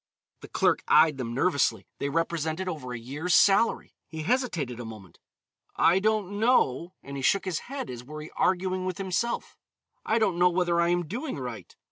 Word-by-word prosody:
The - - -11
clerk - - +1
eyed 155 -2 +5
them 120 -2 -4
nervously. 130 - +1
They 140 - -1
represented 165 +2 -1
over 150 -8 -5
a 120 - -4
year's 145 +9 -1
salary. 200 +3 +3
He 160 0 -6
hesitated 170 - -1
a - - -5
moment, 105 -6 -11 0.6
"I 175 +3 +4
don't 205 -1 0
know," 185 - +2
and 140 0 -7
he - - -4
shook 195 +10 +2
his 180 -4 -1
head, 275 0 -4
as 125 -2 -7
were 150 +4 -8
he 155 - -11
arguing 185 0 0
with 185 0 -3
himself 195 +4 -2 0.4
"I 220 - +1
don't 195 -6 +1
know 180 0 +6
whether 175 -1 +1
I 170 - +2
am 175 0 +1
doing 245 - -4
right." 125 -4 -7
170 Hz, 185 wpm, -27 LUFS, 140-190 Hz, 0.6 s, know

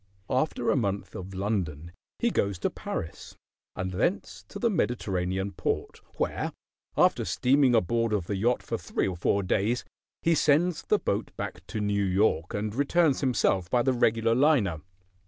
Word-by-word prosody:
After 130 -2 +1
a - - +2
month 100 -6 -1
of 95 +1 -7
London 90 -6 -2 0.3
he 235 - +1
goes 100 - 0
to 85 - -1
Paris, 80 - -6 0.4
and 95 0 -3
thence 115 - -1
to - - -8
the 240 - +1
Mediterranean 95 - -1
port, 90 - -3
where, - - -2 0.4
after - - +4
steaming 130 -1 +3
aboard 115 +2 +1
of 100 -5 0
the 100 - -2
yacht 120 +5 +1
for - - -3
three - - -1
or 95 - -3
four 100 +3 +1
days, 105 +6 0 0.4
he 165 - +4
sends 155 +2 +3
the 210 - +2
boat 105 - -2
back - - -5
to 110 - -4
New 100 -1 +1
York 90 -3 +1
and 105 0 -2
returns 145 +2 +2
himself 100 -9 +1
by 120 +3 +2
the 130 +1 +2
regular 115 -1 +2
liner. 120 - +3
110 Hz, 165 wpm, -27 LUFS, 95-130 Hz, 0.4 s, after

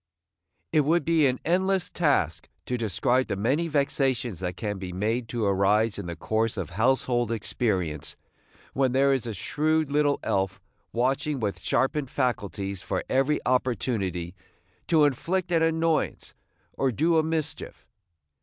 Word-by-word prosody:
It - - +4
would 160 +4 +2
be 160 -3 +4
an 130 -1 -1
endless 190 +2 +1
task 140 - 0 0.2
to 125 - -2
describe 120 +3 +1
the - - -2
many 135 - +1
vexations 135 - 0
that 90 -1 -4
can 105 -3 -3
be 95 -1 -5
made 110 +6 -1
to 115 -3 -1
arise 100 +2 +2
in 95 - -5
the 85 - -4
course 110 +7 -1
of - - -4
household 120 +2 +1
experience 95 - -1 0.6
when 130 -2 +1
there 135 +1 +4
is 130 -3 -1
a 115 - -3
shrewd 155 - 0
little 145 -1 +2
elf 95 -1 -1 0.3
watching 135 +4 0
with 105 -4 -2
sharpened 135 +1 0
faculties 100 -7 -2
for 95 -1 -2
every 135 +3 +2
opportunity 105 -8 -1 0.5
to 160 -3 +5
inflict 175 +6 -1
an 165 -1 +3
annoyance 165 0 0 0.4
or 135 -1 0
do 160 +6 +2
a - - +5
mischief. 160 -1 -4
125 Hz, 145 wpm, -26 LUFS, 100-150 Hz, 0.6 s, to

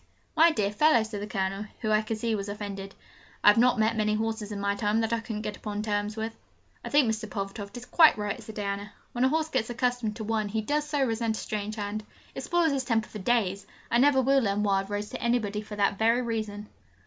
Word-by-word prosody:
'My 330 +1 +7
dear 210 -11 0
fellow!' 235 +1 +4
said 215 -2 -6
the 205 - -4
Colonel, 195 0 -2
who 215 -2 0
I 215 0 +4
could 220 0 -3
see 230 +1 -1
was 200 -1 -3
offended, 200 -1 -6 0.5
'I've 205 +2 +7
not 250 +1 +4
met 220 +1 +2
many 215 -1 +1
horses 220 -1 -2
in 205 - -4
my 200 0 +1
time 210 +1 0
that 225 0 0
I 230 - +1
couldn't 220 -2 -5
get 210 -1 -4
upon 210 -1 -4
terms 210 0 -2
with.' 225 +1 -3 0.5
'I - - -5
think 285 -3 +4
Mr. 215 -1 -4
Pulvertoft 200 +1 -5
is 245 - -8
quite 320 +1 +6
right,' 210 -1 -3
said 220 - -10
Diana. 200 0 -3 0.2
'When 245 +1 +1
a - - +4
horse 315 +2 0
gets 255 -6 -1
accustomed 240 -2 -1
to 220 - -5
one 215 -1 -1
he 220 +2 -1
does 295 +6 -1
so 290 -3 +2
resent 225 -1 -1
a - - -5
strange 210 0 -4
hand: 210 0 -4 0.3
it - - -5
spoils 345 -2 +2
his 270 -2 0
temper 225 -3 0
for 210 - -7
days. 200 -2 0 0.2
I 235 - +4
never 265 0 +5
will 270 +1 +4
lend 205 -2 0
Wild 195 -1 +1
Rose 205 +1 -3
to - - -6
anybody 220 -4 0
for 210 0 -8
that 200 -1 +1
very 230 +3 +3
reason!' 215 -3 -4
215 Hz, 240 wpm, -28 LUFS, 205-240 Hz, 0.5 s, My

